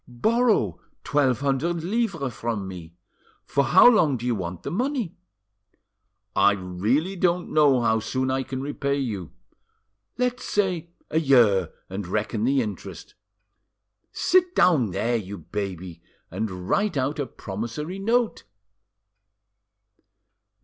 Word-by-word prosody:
Borrow 205 - +1 0.2
twelve 135 -4 +1
hundred 150 +5 0
livres 185 - -1
from 110 -4 -3
me. 85 -3 -9 0.5
For 140 0 +1
how 185 - +7
long 165 - +4
do 120 - -7
you 125 - +1
want 90 -4 -5
the 140 - -4
money?" 240 - -2 1.2
"I 100 +1 +5
really 105 - -1
don't 175 -1 0
know 145 -5 +4
how 110 -1 +2
soon 130 +4 -1
I 135 0 0
can 130 0 -5
repay 140 0 -1
you." 105 - -4 0.9
"Let's 250 0 -1
say 185 -5 -1 0.2
a 160 - +2
year, 115 - +4 0.2
and 95 0 -5
reckon 110 +3 -1
the 135 0 +2
interest. 105 -2 -8 1.0
Sit 365 -1 +2
down 150 - +4
there, 115 +7 0
you 100 -2 -6
baby, 90 -1 -6 0.3
and 95 -2 -4
write 205 - +1
out 135 +4 -1
a 140 - -1
promissory 120 - -6
note." 230 +3 0
130 Hz, 125 wpm, -25 LUFS, 100-170 Hz, 1.2 s, how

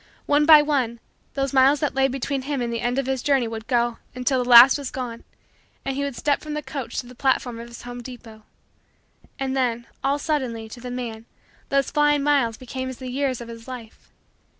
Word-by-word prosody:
One 295 +1 +3
by 305 -2 +9
one, 260 -6 0 0.4
those 275 -1 -1
miles 270 +2 +5
that 295 - 0
lay 270 0 +3
between 270 +1 -2
him 280 +1 -3
and 235 -1 -2
the 230 - -2
end 245 +2 -1
of 275 - 0
his 265 -1 -1
journey 270 -4 +2
would 225 0 -7
go 240 -2 +1 0.2
until 250 0 +1
the 245 - -6
last 245 +2 +10
was 275 -2 -4
gone 240 -3 -6 0.6
and 270 -1 -2
he 280 - -1
would 280 -3 -3
step 285 +3 0
from 305 -1 -5
the 300 - -4
coach 265 -6 -6
to - - -17
the 250 - -12
platform 250 -2 0
of 235 - -8
his 235 0 -11
home 245 0 -7
depot. 235 -3 -11 1.0
And, 270 -1 -2
then, 240 -3 0 0.2
all 275 +1 +2
suddenly, 260 -7 -2
to 240 - -10
the 250 - -6
man, 235 -2 -6 0.4
those 275 -1 +1
flying 295 -1 +3
miles 275 -6 +2
became 260 +1 -5
as 260 - -7
the 255 -1 -7
years 265 -2 -1
of 235 - -8
his 230 0 -10
life. 240 -4 -10
260 Hz, 220 wpm, -23 LUFS, 235-275 Hz, 1.0 s, last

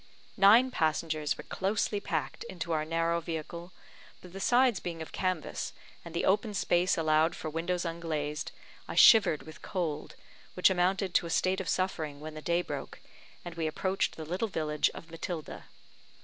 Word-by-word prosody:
Nine 220 +6 +7
passengers 155 -4 0
were - - -8
closely 200 +1 -1
packed - - -3
into 175 -5 -5
our 155 -1 +1
narrow 165 +1 0
vehicle, 170 +2 -6 0.5
but 180 -1 -14
the 195 - -6
sides 245 +1 +3
being 170 -2 -5
of 160 - -7
canvas, 185 -4 -2 0.3
and 170 0 -10
the - - 0
open 205 +2 +1
space 180 -1 +2
allowed 155 0 +3
for 155 - -5
windows 170 +3 -2
unglazed, 155 -3 -3 0.4
I - - -5
shivered 200 -9 +7
with 155 - -12
cold, 160 -5 -3 0.4
which 180 +1 +5
amounted 185 +1 +1
to 170 - +2
a - - -7
state 185 +3 +1
of 185 - -5
suffering, 160 -6 -1
when 155 +1 -7
the 155 - -8
day 170 +2 +1
broke, - - -6 0.5
and 175 - -6
we 165 -1 -2
approached 190 +5 -1
the 160 - -6
little 180 +8 -1
village 155 -6 0
of 165 - -10
Matilda. 165 -1 -6
170 Hz, 170 wpm, -30 LUFS, 155-185 Hz, 0.5 s, Nine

